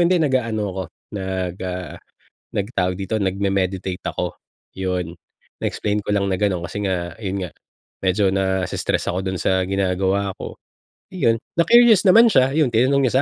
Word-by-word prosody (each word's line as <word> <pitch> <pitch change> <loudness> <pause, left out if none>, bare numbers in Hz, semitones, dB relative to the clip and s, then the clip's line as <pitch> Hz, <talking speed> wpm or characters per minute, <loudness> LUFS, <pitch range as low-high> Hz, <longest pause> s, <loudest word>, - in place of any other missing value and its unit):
"Hindi 180 +2 +3
nag-aano 125 -7 +1
ako 95 +1 -3 0.3
nag 95 -2 -3
ah, 90 0 -5 0.6
nag 100 - 0
tawag 90 -4 0
dito? 100 +3 -2
nag-memeditate 95 -1 -1
ako," - - -3 0.4
yun. 90 -3 -2 0.5
Na-explain 105 0 -1
ko 105 0 -1
lang 100 -1 +1
na - - +1
ganon 95 -4 0
kasi 100 +4 -5
nga, 85 -3 -2
yun 95 -2 -3
nga 90 - -8 0.5
medyo 95 +1 +2
nas-stress 95 -1 -1
ako 90 - -2
dun 95 -1 -2
sa 95 - +2
ginagawa 95 +1 0
ko. - - -7 0.6
Iyon. 115 -11 +1 0.2
na-curious 225 +2 +6
naman 230 +5 +7
siya, 130 -8 +3
ayun 150 -3 +3
tinanong 130 +5 +3
niya 120 - 0
100 Hz, 155 wpm, -21 LUFS, 95-115 Hz, 0.6 s, naman